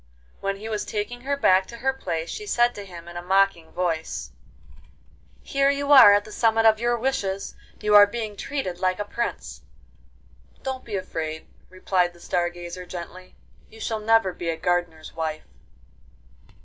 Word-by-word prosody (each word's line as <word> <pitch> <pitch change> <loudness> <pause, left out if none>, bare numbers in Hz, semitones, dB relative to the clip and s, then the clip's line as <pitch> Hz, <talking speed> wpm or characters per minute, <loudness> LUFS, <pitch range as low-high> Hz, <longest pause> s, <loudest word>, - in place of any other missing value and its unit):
When 195 0 -2
he 210 +3 -8
was 215 -2 -2
taking 220 +4 -4
her 280 +2 -1
back 190 -7 +4
to 235 - -10
her 265 +3 0
place 170 -10 -4
she 420 - -6
said 240 -7 +3
to 205 - -8
him 170 -2 -11
in 175 0 -8
a - - -4
mocking 190 -2 +1
voice: 165 -3 -3 1.1
'Here 275 0 +2
you 280 0 0
are 255 -7 +10
at 205 - 0
the 215 - -11
summit 225 0 +2
of 220 -1 +5
your 240 +1 +1
wishes: 200 -6 -2 0.3
you 210 -1 0
are 205 0 +9
being 220 -1 -5
treated 200 -7 -4
like 185 0 +1
a 205 - -3
prince.' 235 +3 -4 1.0
'Don't 265 -1 -4
be 215 - -5
afraid,' 160 -4 -4 0.2
replied 185 -1 0
the 175 - -18
Star 175 0 0
Gazer 175 +1 -8
gently. 180 +1 -9 0.3
'You 220 - -15
shall 220 -1 -2
never 215 -3 +3
be 170 -1 -4
a 165 - -2
gardener's 175 -2 -2
wife. 160 -1 -3
195 Hz, 175 wpm, -24 LUFS, 175-230 Hz, 1.1 s, are